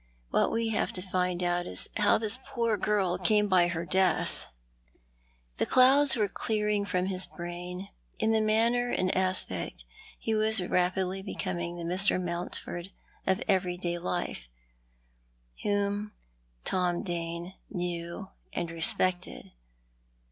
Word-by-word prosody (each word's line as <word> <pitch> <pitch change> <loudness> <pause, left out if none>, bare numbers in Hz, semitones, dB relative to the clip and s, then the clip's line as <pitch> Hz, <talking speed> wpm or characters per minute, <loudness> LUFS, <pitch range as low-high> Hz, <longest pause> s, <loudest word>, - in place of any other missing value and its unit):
AVhat - - +3
we 230 0 0
have 220 - 0
to - - -3
find 180 -1 -1
out 175 0 0
is 90 - -1
how 210 -1 +4
this 225 +3 +2
jioor 235 -7 -2
girl 190 -4 +1
came 210 +3 +3
by 180 -3 +4
her 170 -1 -3
death." 185 +3 0 1.1
The - - 0
clouds 270 +2 +5
were 215 -3 +1
clearing 210 0 -1
from 185 -2 0
his 185 -1 0
brain, 180 +2 -7 0.3
and 220 0 +2
in 220 - +2
manner 235 +3 +2
and 185 -5 0
aspect 185 0 -2 0.3
he 225 - -2
was 220 0 +5
rapidly 185 +1 0
becoming 175 -3 -4
the 170 - -6
Mr. 185 +3 +3
Mountford 175 0 -4 0.4
of 190 -1 +1
everyday 180 -3 0
life, 175 - -4 1.1
whom 205 +1 -1 0.5
Tom 180 -2 0
Dane 170 0 -4 0.2
knew 175 +1 -4 0.3
and 170 -1 -3
respected. 180 +2 +4
185 Hz, 125 wpm, -29 LUFS, 175-210 Hz, 1.1 s, clouds